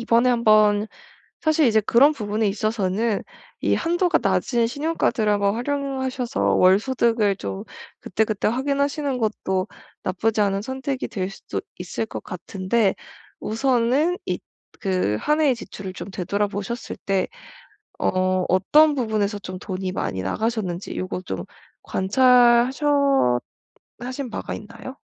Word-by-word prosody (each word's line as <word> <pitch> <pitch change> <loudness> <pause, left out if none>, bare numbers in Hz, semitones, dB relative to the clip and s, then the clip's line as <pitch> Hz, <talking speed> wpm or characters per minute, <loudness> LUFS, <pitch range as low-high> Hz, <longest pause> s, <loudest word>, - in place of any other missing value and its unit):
이번에 235 +2 +3
한번 215 -3 +4 0.6
사실 315 -1 +3
이제 220 -2 +4
그런 250 +8 +5
부분에 215 -4 -1
있어서는 210 +1 0 0.4
이 - - +2
한도가 345 +1 +2
낮은 235 -2 +1
신용카드를 280 -6 0
한번 200 0 +1
활용하셔서 265 -1 -1
월소득을 210 +1 +3
좀 95 - -5 0.4
그때그때 215 -1 0
확인하시는 280 +3 0
것도 195 -4 -1 0.4
나쁘지 210 +4 0
않은 200 -1 +1
선택이 265 +3 -3
될 190 -3 -3
수도 - - -5 0.2
있을 180 +5 -3
것 - - -7
같은데, 190 +3 -1 0.5
우선은 260 - +1
이 - - 0 0.4
그 185 - 0
한 300 +1 +1
해의 280 -5 +3
지출을 195 -5 -8
좀 195 - -8
되돌아 200 +3 -1
보셨을 205 +4 -5
때 195 -1 0 0.7
어 185 0 +1
어떤 295 - +5
부분에서 215 -5 -1
좀 185 0 -7
돈이 185 -1 -4
많이 95 - -3
나가셨는지 200 - -2
요거 185 0 -4
좀 95 - -5 0.4
관찰하셨 240 +4 +4 1.3
하신 255 +1 -5
바가 - - -5
있나요? 230 +5 -9
220 Hz, 285 characters per minute, -23 LUFS, 195-255 Hz, 1.3 s, 그런